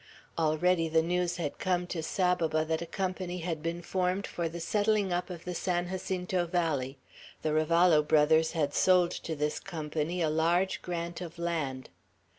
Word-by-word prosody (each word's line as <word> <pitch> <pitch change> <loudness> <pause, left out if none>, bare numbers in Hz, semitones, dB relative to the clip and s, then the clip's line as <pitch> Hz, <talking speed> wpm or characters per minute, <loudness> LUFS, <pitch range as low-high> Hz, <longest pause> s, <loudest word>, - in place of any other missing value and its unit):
Already 165 +1 +2
the 160 0 +3
news 175 +1 0
had 155 -5 -4
come 180 -1 0
to 175 -2 -4
Saboba 165 -2 +1
that 160 +1 -1
a 170 - -5
company 185 0 -3
had 165 -3 -3
been 170 +2 -3
formed 185 +2 0
for 170 -1 -3
the 170 +1 -7
settling 205 +1 +1
up 175 +2 -1
of 175 -2 -8
the 180 - -3
San 175 0 -1
Jacinto 180 -1 -2
valley; 150 -6 -1 0.5
the 155 - +1
Ravallo 155 +1 +4
brothers 160 +2 +3
had 145 -4 0
sold 180 -2 +4
to 160 - -4
this 150 0 -1
company 160 -1 -3
a 160 -2 +2
large 170 +4 +1
grant 170 0 -4
of 170 -1 -7
land. 155 -7 -3
170 Hz, 170 wpm, -30 LUFS, 160-180 Hz, 0.5 s, Ravallo